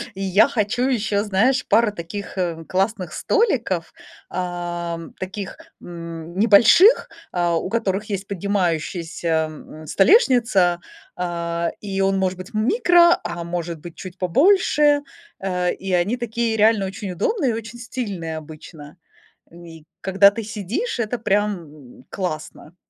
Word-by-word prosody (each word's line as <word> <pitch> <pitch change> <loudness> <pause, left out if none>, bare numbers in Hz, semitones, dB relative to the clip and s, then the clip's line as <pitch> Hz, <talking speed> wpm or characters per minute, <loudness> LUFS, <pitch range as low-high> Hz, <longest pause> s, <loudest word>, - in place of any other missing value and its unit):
и 195 - -6
я 195 +4 +4
хочу 245 -1 -1
ещё, 215 -5 0
знаешь, 220 +6 +2
пару 230 -2 +3
таких, 200 +3 -7
э, 170 -3 -2
классных 190 -3 -1
столиков, 250 - 0 0.4
ам, 175 -2 -4
таких, 190 +1 -6 0.2
мм, 170 0 -8
небольших, 230 - +6 0.2
э, 175 -1 +1
у 165 - -1
которых 205 -2 -1
есть 195 0 -3
поднимающаяся, 170 -4 -1
мм, 155 0 -12
столешница, 215 - +4 0.4
а, 170 -1 -2
и 195 -2 -3
он 195 0 +2
может 185 -1 0
быть 185 +6 -10
микро, 345 - +4
а 170 0 -4
может 170 -1 -4
быть 170 +1 -10
чуть 185 -1 -9
побольше. 295 - +3 0.4
Э, 180 -2 -1
и 190 -1 -5
они 180 +8 +1
такие 235 -1 -2
реально 215 -1 +4
очень 190 0 -6
удобные, 270 - 0
и - - -2
очень 230 +1 -7
стильные 200 -10 -5
обычно, 155 0 -11 0.5
и 165 -2 -13 0.2
когда 195 +1 +5
ты 225 +2 -5
сидишь, 225 - -4
это 235 +1 -1
прям, 205 -2 0 0.4
м, 125 - -18
классно. 155 -2 -6
195 Hz, 135 wpm, -21 LUFS, 170-225 Hz, 0.5 s, небольших